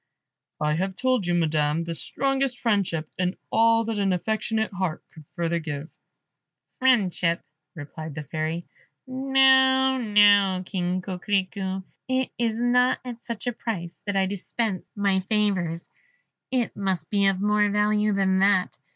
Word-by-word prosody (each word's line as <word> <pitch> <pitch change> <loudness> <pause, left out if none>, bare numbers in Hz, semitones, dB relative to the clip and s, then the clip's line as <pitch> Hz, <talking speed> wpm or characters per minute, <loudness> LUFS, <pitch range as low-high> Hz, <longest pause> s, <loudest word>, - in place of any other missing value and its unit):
"I 150 0 +1
have 190 +4 -2
told 255 -4 0
you, 175 - +1
Madam, 155 -2 +1
the 170 0 -4
strongest 270 - -1
friendship, 195 -9 0
and 180 0 -1
all 230 0 +4
that 225 -2 -3
an 195 -2 +2
affectionate 220 +3 -1
heart 185 -4 -3
could 155 -2 -15
further 170 -1 -1
give 155 -1 -6 0.4
" - - -59
"Friendship," 190 -9 +2 0.3
replied 155 0 -8
the 160 - -5
Fairy; 160 +4 -3 0.4
"no, 265 0 +4
no, 205 -4 +4
King 180 -1 -2
Coquerico, 190 0 -2 0.2
it 260 0 0
is 230 -1 0
not 250 +1 +3
at 240 -1 -8
such 235 -1 -5
a 245 - -1
price 175 -7 -5
that 205 - -1
I 195 -1 +3
dispense 200 +1 -3
my 200 -2 +1
favours 190 -4 -1 0.6
it 250 -3 -1
must 190 -5 -2
be 200 -1 +3
of 195 -1 +1
more 210 +1 +2
value 210 +1 +2
than 190 -1 +2
that. 195 -1 +2
200 Hz, 145 wpm, -25 LUFS, 175-230 Hz, 0.6 s, all